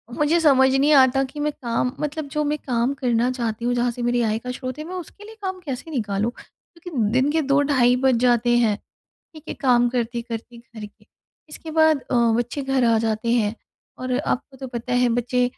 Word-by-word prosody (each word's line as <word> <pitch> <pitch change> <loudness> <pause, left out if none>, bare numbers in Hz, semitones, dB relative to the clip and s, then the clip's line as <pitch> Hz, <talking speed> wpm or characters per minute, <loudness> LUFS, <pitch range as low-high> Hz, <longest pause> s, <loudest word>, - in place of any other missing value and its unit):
मुझे 300 +3 +2
समझ 270 -5 +5
नहीं 285 +3 +4
आता 270 -1 +5
कि 300 - -8
मैं 300 +1 0
काम 240 0 -1
मतलब 300 0 -3
जो 300 - +1
मैं 300 +1 -1
काम 245 +1 +1
करना 240 -1 +1
चाहती 235 -2 -3
हूँ। 245 - +1
जहाँ 240 0 +1
से 245 - -8
मेरी 240 0 +1
आय 220 -2 0
का 250 +2 -6
स्रोत 255 +1 -6
है, - - -4
मैं 355 - -8
उसके 365 +3 -9
लिए 445 +1 -12
काम 375 -1 -4
कैसे 275 +3 -6
निकालूँ? 215 -4 -1
क्योंकि 335 - -5
दिन 260 +4 +2
के 320 +1 +1
2 280 0 +2
ढाई 255 -4 +3
बज 260 -2 +4
जाते 240 -1 +3
हैं। 225 -3 +2 0.6
ठीक 310 - -12
है - - -4
काम 245 -3 +3
करते 235 -1 -2
करती, 235 0 -8
घर 230 -2 -10
के, 205 - -22 0.4
इसके 315 +1 -9
बाद 315 -2 +3
अ, - - 0 0.2
बच्चे 240 +4 -2
घर 270 -1 +1
आ 230 -1 +4
जाते 225 +1 -1
हैं 220 -3 +1 0.4
और 255 0 -2
आपको 270 +1 -3
तो 265 - -7
पता 245 0 -5
है 245 0 +3
बच्चे 245 +1 0
250 Hz, 215 wpm, -22 LUFS, 235-285 Hz, 0.6 s, समझ